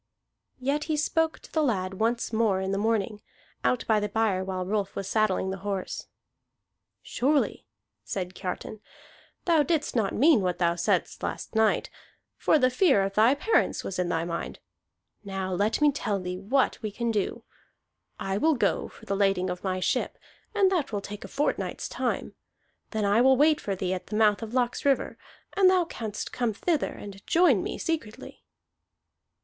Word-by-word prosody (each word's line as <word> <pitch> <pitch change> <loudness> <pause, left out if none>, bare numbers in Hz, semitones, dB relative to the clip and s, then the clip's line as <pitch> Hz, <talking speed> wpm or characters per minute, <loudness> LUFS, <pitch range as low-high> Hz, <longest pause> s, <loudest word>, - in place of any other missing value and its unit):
Yet 280 +3 -1
he 310 -2 -1
spoke 320 +2 +1
to - - -15
the 315 - +1
lad 195 -9 0
once 230 +1 0
more 220 -4 +2
in 190 0 -2
the 195 - 0
morning, 215 -1 0 0.4
out 250 - +1
by 220 -1 +3
the 210 0 -2
byre 205 -3 +1
while 185 -1 -3
Rolf 200 0 -2
was 195 - -4
saddling 200 -3 +1
the 190 - -4
horse. 195 -1 -4 1.0
"Surely," 285 +3 0 0.4
said 185 -2 -4
Kiartan, 185 +4 -5 0.7
"thou 330 -3 +4
didst 300 -2 0
not 215 -5 +1
mean 285 -3 +5
what 180 -1 -1
thou 170 -1 +2
saidst 170 - 0
last - - -4
night, 220 -1 +2 0.4
for - - +3
the 255 -3 +3
fear 250 - +4
of 195 0 -2
thy 225 +6 +5
parents 430 +10 +1
was 185 - -4
in 180 -1 0
thy 165 -1 0
mind. 170 0 -4 0.7
Now 190 -2 -3
let 205 +5 +1
me 295 -1 +6
tell 210 -7 -2
thee 180 0 -5
what 255 +8 +1
we 215 - -2
can 235 +3 -2
do. 205 -3 -2 0.8
I 195 +1 -2
will 315 +3 +3
go 240 - +1
on - - -9
for 220 - -16
the 200 - -1
lading 195 -2 +1
of 180 - -6
my 185 -1 -1
ship, 185 +7 -1 0.4
and 390 -2 +4
that 335 -10 0
will 205 -2 -2
take 205 +1 -8
a - - -7
fortnight's 290 - -2
time. - - -2 0.6
Then 220 -2 -1
I 205 +3 +4
will 265 +1 +5
wait 300 +2 +4
for 200 - -2
thee 185 0 -2
at 185 - -5
the 210 - -4
mouth 210 -1 +3
of 225 -1 -6
Laxriver, 255 +2 +1 0.4
and 390 -2 +6
thou 370 -2 +3
canst 220 -9 -5
come 240 -3 0
thither 315 - 0
and 200 -1 -10
join 325 - +4
me - - -4
secretly." 310 -10 -4
215 Hz, 180 wpm, -27 LUFS, 195-270 Hz, 1.0 s, me